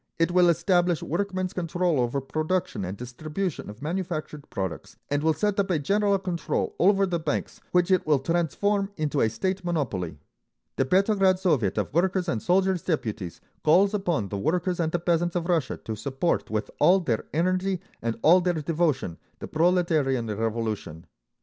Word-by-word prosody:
It 165 +1 +2
will 175 -1 +5
establish 175 0 +2
workmen's 185 +2 -2
control 175 -3 0
over 120 +3 0
production 155 - -2
and 95 +2 -5
distribution 155 - -4
of 105 +6 -10
manufactured 160 -3 -4
products, 95 -3 -5
and 145 0 +1
will 160 0 +2
set 205 +5 0
up 200 -1 +1
a 175 - +2
general 200 +7 +2
control 180 -3 -2
over 195 +2 +4
the 175 -3 -1
banks, 160 - -3
which 180 +1 +2
it 185 -4 +2
will 150 -2 +4
transform 175 +7 0
into 150 -2 0
a 110 - +3
state 185 - -2
monopoly. 105 - -2 0.6
The 135 - +2
Petrograd 190 +3 +3
Soviet 150 - +1
of 105 +2 -2
Workers' 185 +2 +1
and 115 -9 -1
Soldiers' 185 0 +2
Deputies 110 - -3 0.2
calls 190 +6 +4
upon 175 - -1
the 100 - -3
workers 175 - 0
and 160 -2 0
the 175 - +1
peasants 175 0 0
of 170 -1 -1
Russia 165 -7 0
to 110 - -6
support 135 +8 -1
with 110 -1 -2
all 180 +6 +6
their 120 -10 -1
energy 185 +3 0 0.2
and 115 0 -2
all 175 +4 +7
their 175 -1 0
devotion 155 - -1 0.2
the - - -7
Proletarian 160 -7 +2
Revolution. 110 -6 -3
170 Hz, 170 wpm, -26 LUFS, 135-185 Hz, 0.6 s, all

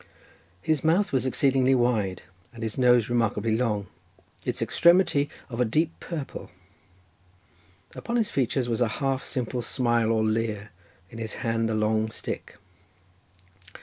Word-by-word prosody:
His 155 0 +1
mouth 170 +4 +2
was 130 0 +1
exceedingly 130 0 +3
wide, 110 -7 0 0.3
and 115 -1 -8
his 110 -1 -3
nose 125 -3 +4
remarkably 115 -2 +1
long; 110 -4 0 0.6
its - - -2
extremity 170 -5 +3 0.2
of 120 0 -3
a - - +6
deep 155 +8 +1
purple; 155 -6 -6 1.4
upon 235 - -4
his 230 -3 +1
features 130 -1 0
was 115 0 -1
a 120 - +4
half 135 -2 -1
simple 125 -1 -3
smile 120 -2 +1
or 110 -1 +2
leer; 110 -1 -1 0.4
in 115 - -9
his 110 -1 -4
hand 115 0 +1
was 110 - 0
a - - 0
long 110 +1 +1
stick. 110 - -6
120 Hz, 145 wpm, -26 LUFS, 110-135 Hz, 1.4 s, a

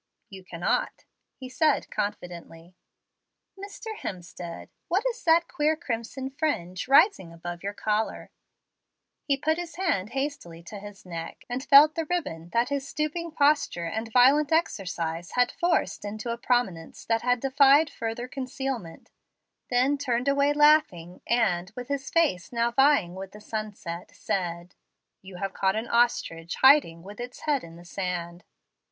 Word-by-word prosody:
"You 190 -1 -10
cannot," 175 -1 -2 0.3
he 260 - -9
said 300 +2 +1
confidently. 175 -3 -5 0.8
"Mr. 405 +3 -8
Hemstead, 175 - -7 0.2
what 380 +5 +1
is 485 - -14
that 335 0 +4
queer 310 -2 +1
crimson 260 -2 -5
fringe 215 - -2
rising 280 - +4
above 175 +1 -7
your 200 +1 -4
collar?" 215 +1 -2 0.9
He 280 -2 +1
put 315 +4 0
his 345 -1 -6
hand 235 - -1
hastily 270 - -4
to 205 +4 -9
his 205 -1 -11
neck, 165 -2 -7
and 245 +2 -4
felt 290 +2 +7
the 325 -1 -3
ribbon 175 - -3
that 235 +6 +1
his 280 -1 -2
stooping 310 +3 -3
posture 285 - +2
and 220 +7 -4
violent 275 +5 +5
exercise 175 - -1
had 245 0 +2
forced 350 0 0
into 215 +3 -4
a - - -6
prominence 215 -11 -1
that 235 +2 +1
defied 275 +3 +5
further 230 +2 -4
concealment; 260 -8 -5 0.6
then 260 +3 +2
turned 250 -2 -1
away 280 +1 +3
laughing, 290 - +3
and, 195 -6 +1
with 250 +1 -7
his 280 -1 -3
face 305 - +1
now 235 0 +1
vying 270 -8 +3
with 190 +1 -8
the 210 - -11
Sunset, 210 -5 -6
said, 175 -2 -3 0.5
"You 190 -1 -12
have 195 +1 -4
caught 190 0 +1
an 220 +2 -3
ostrich 170 -9 0
hiding 265 - +5
with 205 +3 -11
its 245 +1 -7
head 290 -3 0
in 165 0 -11
the 175 +1 -14
sand." 175 -1 -4
235 Hz, 145 wpm, -27 LUFS, 180-285 Hz, 0.9 s, felt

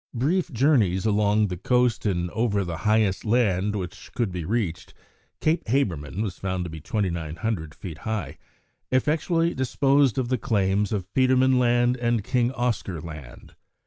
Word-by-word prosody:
Brief 160 +8 0
journeys 115 - +2
along 105 0 +3
the 90 - -4
coast 125 +2 +1
and 90 -3 -1
over 105 -4 0
the 85 -2 -4
highest 110 -3 +2
land 105 -3 +1
which 95 -3 -6
could 115 -6 0
be 90 -1 -4
reached 100 -3 -3 0.5
Cape 160 +2 +1
Habermann 100 - -1
was 95 -4 -5
found 95 -2 -2
to 85 - -6
be 80 -1 -8
2900 85 - -3
feet 80 -4 -8
high 105 -10 -4 0.5
effectually 165 +5 +1
disposed 135 0 +2
of 125 -2 -1
the 130 -2 0
claims 100 -1 +1
of 100 -4 -2
Petermann 130 0 +4
Land 120 0 +3
and 120 -3 0
King 120 +2 +1
Oscar 115 -9 -2
Land. 75 -6 -10
110 Hz, 150 wpm, -25 LUFS, 90-125 Hz, 0.5 s, Petermann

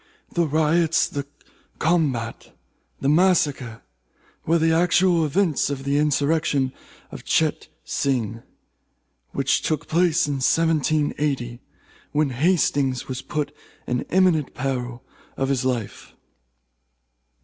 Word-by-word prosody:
The 170 -2 +1
riots, 160 +2 +2
the 140 -1 -5 0.5
combat, 145 -9 -1 0.4
the - - 0
massacre, 145 -8 +2 0.6
were 165 +2 +4
the 160 0 +2
actual 170 0 +3
events 165 -1 +1
of 140 -2 -4
the 140 +1 +1
insurrection 145 -2 +1 0.4
of - - -9
Cheyte - - 0 0.2
Sing, 115 -5 -1 0.9
which - - 0
took 155 -2 -2
place 170 0 +2
in 145 -1 -2
1780, 150 -5 +1 0.5
when 150 -2 +1
Hastings 140 -3 +1
was 130 0 -4
put 150 -1 -3 0.3
in 125 0 -1
imminent 180 -6 +2
peril 125 -2 -3 0.3
of 135 0 -1
his 135 -2 0
life. 120 -5 -3
145 Hz, 105 wpm, -23 LUFS, 130-165 Hz, 0.9 s, were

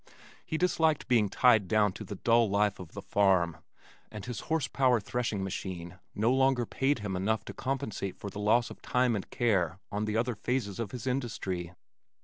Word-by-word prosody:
He 160 - -3
disliked 160 -3 +2
being 115 -5 +3
tied 110 -3 +4
down 105 0 +3
to - - -7
the 100 - -7
dull 115 +2 +3
life 100 0 +1
of 90 -4 -10
the - - -7
farm, 95 -5 +2 0.5
and 105 -2 -7
his 125 -3 -5
horse 160 -5 -1
power 125 -2 +3
threshing 110 -2 -2
machine 90 -2 -5 0.2
no 115 +4 +2
longer 130 -2 +3
paid 135 +5 0
him 105 -4 -4
enough 105 +4 0
to - - -7
compensate 110 -8 -3
for 100 - -7
the 105 - -7
loss 115 +3 +2
of - - -11
time 125 -2 +1
and 100 - -5
care 95 -8 +1
on 105 +1 -1
the 105 0 -1
other 120 +2 +1
phases 110 -2 -2
of 115 -3 -2
his 125 +3 -7
industry. 100 -9 -3
110 Hz, 190 wpm, -30 LUFS, 100-125 Hz, 0.5 s, tied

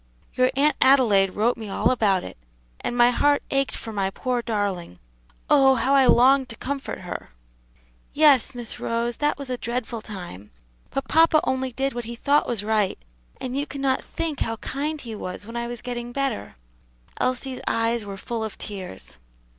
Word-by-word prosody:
Your 255 0 +3
Aunt 285 +1 +3
Adelaide 215 -8 +5
wrote 230 +4 +2
me 220 -3 -7
all - - +2
about 200 -7 +2
it, - - -8 0.4
and 245 - -3
my 240 0 +6
heart 290 +3 +2
ached 275 -1 +1
for 225 - -7
my 195 -2 0
poor 245 +4 -2
darling; 200 - -2 0.5
oh, 270 -2 +6
how 260 +3 +1
I 270 -2 +6
longed 260 +2 +5
to 230 - -7
comfort 275 -3 -5
her!" 180 - -6 0.8
"Yes, 280 -4 +4
Miss 240 -2 -6
Rose, 235 +1 -1
that 295 0 +1
was 280 -1 -7
a 250 - -2
dreadful 235 -1 -3
time; 175 - -8 0.4
but 275 - -3
papa 320 0 +5
only 260 0 -1
did 270 +3 -1
what 240 -1 -5
he 235 +1 -6
thought 285 +5 +2
was 225 -4 -1
right, 210 -2 +1 0.4
and 255 0 -4
you 285 +2 -1
cannot 275 -2 -1
think 320 -4 -3
how 225 - -1
kind 295 +7 -3
he 235 -5 -7
was 205 -1 -6
when 230 +2 -9
I 235 0 -2
was 240 -1 -7
getting 240 -1 -4
better." 270 - -2 0.6
Elsie's 255 +1 -1
eyes 230 0 +1
were 200 -1 -7
full 230 +3 -4
of 220 - -5
tears. 185 - -8
240 Hz, 180 wpm, -24 LUFS, 215-270 Hz, 0.8 s, my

